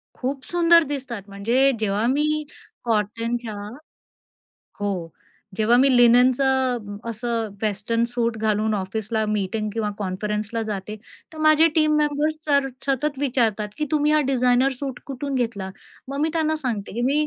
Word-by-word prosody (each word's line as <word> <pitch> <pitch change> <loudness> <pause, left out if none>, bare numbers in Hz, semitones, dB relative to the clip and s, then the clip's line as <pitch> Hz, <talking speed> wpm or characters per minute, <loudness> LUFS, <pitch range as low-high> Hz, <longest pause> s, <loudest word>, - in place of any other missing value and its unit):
खूप 265 +1 -3
सुंदर 340 -1 +5
दिसतात. 265 -7 -5
म्हणजे 235 +8 +2
जेव्हा 210 +1 0
मी 305 +3 +1 0.4
कॉटनच्या 230 +1 -1 1.3
हो, 190 -5 -2 0.5
जेव्हा 225 +2 +4
मी 270 +2 +5
लिनेनचं 245 -2 +3
असं 230 0 -2
वेस्टर्न 215 +2 0
सूट 235 -2 0
घालून 215 0 +1
ऑफिसला 215 +3 -2
मीटिंग 215 +1 -1
किंवा 215 -1 -1
कॉन्फरन्सला 210 +3 -3
जाते, 210 -1 -5 0.4
तर 315 - -11
माझे 310 +1 +5
टीम 310 -1 +3
मेंबर्स 300 +1 0
सर 280 -2 +2 0.2
सतत 275 +1 0
विचारतात, 235 -6 0
की 305 - 0
"तुम्ही 300 0 +2
हा 305 - +4
डिझाइनर 255 +1 +3
सूट 270 -3 -5
कुठून 275 +1 -4
घेतला?" 225 -7 -2 0.4
मग 275 +1 -3
मी 315 - +2
त्यांना 315 -1 +1
सांगते, 235 -9 -4
की 235 +4 -3
"मी 290 +4 +2
240 Hz, 140 wpm, -23 LUFS, 215-280 Hz, 1.3 s, सुंदर